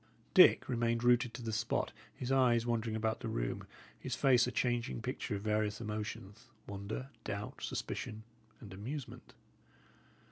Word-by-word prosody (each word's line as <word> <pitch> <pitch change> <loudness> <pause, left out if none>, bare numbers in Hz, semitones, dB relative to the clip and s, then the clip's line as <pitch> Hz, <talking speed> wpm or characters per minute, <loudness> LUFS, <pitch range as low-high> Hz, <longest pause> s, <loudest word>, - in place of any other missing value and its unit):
Dick - - +8
remained 115 -1 +1
rooted 120 0 +4
to 125 - -7
the 110 -1 -3
spot, 110 +2 0 0.2
his 125 +1 -3
eyes 120 -3 +4
wandering 115 -2 0
about 110 0 0
the 115 - -5
room, - - -2 0.3
his - - -3
face 125 -3 +5
a - - -2
changing 120 -2 0
picture 125 -2 -3
of 100 - -5
various 105 0 0
emotions, 105 -1 -5 0.2
wonder, 100 +7 -5
doubt, 105 0 -5
suspicion, 110 0 -4 0.4
and 100 -3 -10
amusement. 125 +8 -7
115 Hz, 145 wpm, -34 LUFS, 105-120 Hz, 0.4 s, Dick